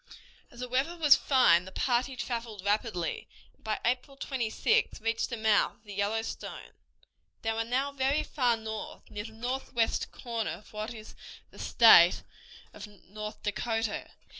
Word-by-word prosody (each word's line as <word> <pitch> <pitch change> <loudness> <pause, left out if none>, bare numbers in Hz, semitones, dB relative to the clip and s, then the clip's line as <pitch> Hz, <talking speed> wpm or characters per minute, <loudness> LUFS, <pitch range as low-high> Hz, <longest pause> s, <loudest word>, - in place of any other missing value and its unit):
As 240 - -12
the 250 - -3
weather 270 +8 -1
was 300 -4 +7
fine 180 -11 +4
the 190 - -10
party 255 +5 0
traveled 230 -5 -5
rapidly, 205 -5 -1 0.3
and - - -33
by 215 -1 -2
April 255 +3 -1
26th 270 - 0
reached 225 +1 -1
the 235 - -4
mouth 220 -1 +3
of - - -33
the 205 -2 -10
Yellowstone. 210 +3 -3 0.7
They 225 - 0
were 225 0 -1
now 260 +5 -1
very 280 +2 +1
far 245 -5 +1
north, 220 -1 -7
near 205 0 -5
the 225 - -10
northwest 245 0 -1
corner 230 -2 -3
of 210 - -13
what 215 +2 -4
is 220 -2 -10 0.4
the - - -15
state 180 -7 +7 0.5
of 210 0 -9
North 210 +1 -9
Dakota. 225 +1 -2
225 Hz, 155 wpm, -29 LUFS, 215-255 Hz, 0.7 s, was